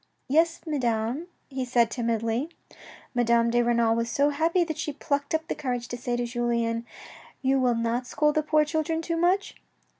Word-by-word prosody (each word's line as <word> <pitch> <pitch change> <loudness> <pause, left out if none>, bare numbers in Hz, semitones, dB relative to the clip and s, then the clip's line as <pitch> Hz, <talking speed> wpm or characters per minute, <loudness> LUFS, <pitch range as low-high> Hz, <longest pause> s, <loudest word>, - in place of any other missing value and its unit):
" - - -46
Yes, 330 0 +3
Madame," 250 0 -1 0.2
he 265 -1 -3
said 240 -2 +2
timidly. 230 +3 -1 0.6
Madame 235 -1 +3
de 240 +1 +3
Renal 235 -1 +2
was 230 0 -1
so 285 +4 +2
happy 330 +4 +2
that 315 -3 -5
she 295 - -2
plucked 285 +1 -1
up 320 0 -2
the - - -1
courage 245 -4 -3
to - - -4
say 245 0 -2
to 240 0 -1
Julien, 235 -1 -1 0.3
" - - -20
You 265 +1 +3
will 250 -2 +2
not 230 +2 -1
scold 300 +3 +2
the 310 - +2
poor 305 0 +3
children 320 +1 -1
too 335 0 -2
much?" 360 +4 +1
250 Hz, 190 wpm, -26 LUFS, 235-305 Hz, 0.6 s, Yes